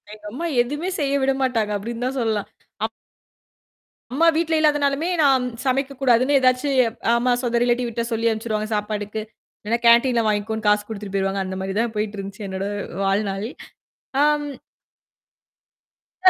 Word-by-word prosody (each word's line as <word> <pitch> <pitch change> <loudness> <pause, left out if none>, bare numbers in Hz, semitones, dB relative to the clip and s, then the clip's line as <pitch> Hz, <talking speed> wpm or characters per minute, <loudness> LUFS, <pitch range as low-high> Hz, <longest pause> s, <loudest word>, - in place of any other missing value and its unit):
எங்க 210 0 -14
அம்மா 280 +9 -4 0.2
எதுவுமே 295 +9 -3
செய்ய 280 -2 0
விட 270 - +3
மாட்டாங்க, 230 -5 +1
அப்டின்னு 230 +4 -4
தான் 270 +1 -3
சொல்லலாம். 220 -3 -1 0.4
அப் 225 - -3 1.2
அம்மா 325 +5 +4
வீட்ல 325 0 +1
இல்லாதனாலுமே 295 +1 +2
நான் 265 -3 +4 0.2
சமைக்கக்கூடாதுன்னு 270 0 +2
ஏதாச்சும் 260 +1 +2 0.4
ஆமா. 245 +1 +2
சொந்த 240 -1 +1
ரிலேட்டிவ் 245 0 +1
வீட்ட 235 0 -2
சொல்லி 230 0 +1
அனுப்பிச்சுடுவாங்க 220 -1 -2
சாப்பாட்டுக்கு. 210 0 -3 0.4
இல்லைனா 230 +3 0
கேன்டீன்ல 235 +1 +5
வாங்கிக்கோன்னு 215 +1 -1
காசு 210 0 +4
குடுத்துட்டு 205 -3 -6
போயிருவாங்க. 195 0 0
அந்த 190 0 -4
மாரி 190 0 -3
தான் 230 -1 0
போயிட்டு 210 0 -2
இருந்துச்சு 195 +1 -7
என்னோட 190 0 -3 0.4
வாழ்நாள். 195 +1 0 0.8
ஆம் 295 0 +2 1.8
அப்படி 370 - +9
235 Hz, 140 wpm, -22 LUFS, 210-270 Hz, 1.8 s, அப்படி